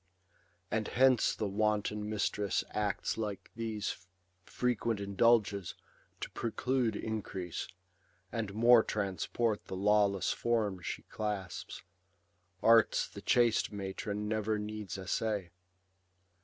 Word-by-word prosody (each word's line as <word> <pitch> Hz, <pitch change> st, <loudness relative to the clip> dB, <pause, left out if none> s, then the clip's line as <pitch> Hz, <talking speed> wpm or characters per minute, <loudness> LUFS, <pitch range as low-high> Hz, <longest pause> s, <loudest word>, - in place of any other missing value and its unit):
And 110 Hz, -1 st, 0 dB
hence 130 Hz, -1 st, +4 dB
the 105 Hz, -, -2 dB
wanton 105 Hz, +1 st, 0 dB
mistress 105 Hz, -1 st, 0 dB
acts 105 Hz, +1 st, -1 dB
like 105 Hz, -3 st, -4 dB
these 110 Hz, -5 st, -4 dB, 0.4 s
Frequent 120 Hz, -3 st, 0 dB
indulges, 100 Hz, -2 st, +2 dB, 0.5 s
to -, -, -4 dB
preclude 120 Hz, 0 st, 0 dB
increase. 100 Hz, -6 st, -4 dB, 0.6 s
And 110 Hz, -3 st, -3 dB
more 120 Hz, +1 st, +7 dB
transport 105 Hz, +2 st, -1 dB
the -, -, -6 dB
lawless 100 Hz, 0 st, +3 dB
form 110 Hz, -6 st, 0 dB
she -, -, -5 dB
clasps: 105 Hz, -4 st, -5 dB, 0.8 s
Arts 115 Hz, -1 st, +5 dB
the -, -, -10 dB
chaste 120 Hz, -2 st, +3 dB
matron 100 Hz, +1 st, -4 dB
never 110 Hz, 0 st, 0 dB
needs 105 Hz, -2 st, -5 dB
essay. 95 Hz, 0 st, -2 dB
105 Hz, 100 wpm, -32 LUFS, 100-115 Hz, 0.8 s, more